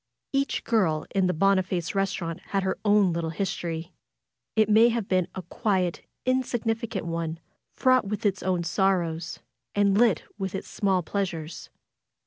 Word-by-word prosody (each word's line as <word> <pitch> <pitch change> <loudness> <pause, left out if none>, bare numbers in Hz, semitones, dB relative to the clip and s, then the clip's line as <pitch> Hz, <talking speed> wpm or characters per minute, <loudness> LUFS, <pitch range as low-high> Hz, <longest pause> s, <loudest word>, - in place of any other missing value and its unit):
Each 275 0 0
girl 180 -10 +1
in 190 -2 +3
the - - +2
Boniface 185 -1 +1
restaurant 190 -4 -1
had 195 -1 0
her 190 - -1
own 205 -4 +4
little 165 -1 -2
history. 170 -1 -3 0.6
It 215 -2 +4
may 220 +2 +6
have 230 -4 -1
been 185 -2 +2
a 185 - -5
quiet, 185 -2 0 0.2
insignificant 230 -5 -1
one, 165 -1 -3 0.4
fraught 255 -3 +4
with 210 +1 -3
its 195 -2 +1
own 180 -2 0
sorrows, 170 -3 0 0.3
and 200 -1 +3
lit 220 -5 +4 0.2
with 190 -1 -3
its 190 - -5
small 190 -3 +1
pleasures. 170 -4 -4
190 Hz, 145 wpm, -26 LUFS, 170-210 Hz, 0.6 s, may